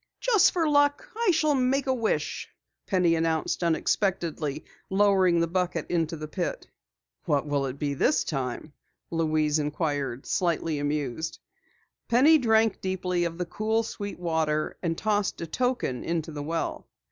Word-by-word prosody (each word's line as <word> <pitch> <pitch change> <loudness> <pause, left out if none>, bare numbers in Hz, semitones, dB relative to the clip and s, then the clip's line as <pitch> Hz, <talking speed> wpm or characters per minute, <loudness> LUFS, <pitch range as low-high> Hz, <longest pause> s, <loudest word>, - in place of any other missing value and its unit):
"Just 450 -7 +4
for 335 -3 +1
luck 290 +8 +3
I 460 -2 +1
shall 310 -3 +3
make 265 +1 +1
a 260 - +2
wish!" 230 -4 -2 0.4
Penny 180 -4 +3
announced 165 +1 0
unexpectedly, 165 -3 0 0.2
lowering 190 -3 +4
the 170 - +2
bucket 180 +1 -2
into 165 -2 0
the 155 0 -6
pit. 175 +3 -3 0.6
"What 145 -1 +1
will 140 -2 0
it 130 +1 -6
be 145 -1 -1
this 260 - +2
time?" 135 +1 -4 0.4
Louise 155 -2 +1
inquired, 145 -4 -2
slightly 165 -3 0
amused. 145 +1 -2 0.7
Penny 290 +7 +6
drank 225 -3 +2
deeply 180 -2 -1
of 165 -1 -4
the 180 - -2
cool, 220 +5 0
sweet 205 -2 -6
water, 160 -3 -1
and 165 -2 -1
tossed 210 -2 0
a 170 - -3
token 245 - -1
into 165 -1 -2
the 150 -1 -5
well. 165 +3 -3
170 Hz, 145 wpm, -27 LUFS, 155-220 Hz, 0.7 s, Penny